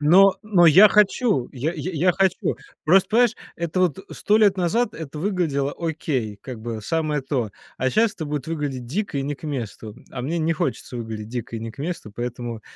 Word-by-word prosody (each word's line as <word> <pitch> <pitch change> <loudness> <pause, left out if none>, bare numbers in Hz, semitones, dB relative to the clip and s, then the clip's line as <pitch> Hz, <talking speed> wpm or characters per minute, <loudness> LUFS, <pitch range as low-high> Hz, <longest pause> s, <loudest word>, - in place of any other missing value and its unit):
Но 185 +6 +6
но 200 -5 +4
я 190 +7 +9
хочу, 210 - +3
я 140 +6 -2
я 175 +2 -4
я 175 +3 +3
хочу. 190 0 +1 0.3
Просто, 185 +4 +5
понимаешь, 240 +1 +4 0.2
это 170 +2 -2
вот 180 -2 +2
100 210 +1 +2
лет 205 -3 +4
назад 215 +6 +1
это 155 -2 -7
выглядело 160 -7 0
окей 145 -10 -2
как 125 -4 -8
бы, 115 -1 -5
самое 155 +4 -1
то, 130 -5 -2 0.3
а 130 0 0
щас 220 -1 +2
это 160 - -5
будет 145 -2 -4
выглядеть 145 -6 -3
дико 165 - -2
и - - -1
не 145 +1 -2
к - - -21
месту, 115 -6 -5
а 125 - -5
мне 165 +6 -1
не 165 0 +1
хочется 135 -4 -3
выглядеть 110 -2 -6
дико 120 -1 -5
и - - -3
не 115 - -5
к - - -22
месту, 150 - -5
поэтому 120 -2 -5
155 Hz, 200 wpm, -23 LUFS, 125-185 Hz, 0.3 s, я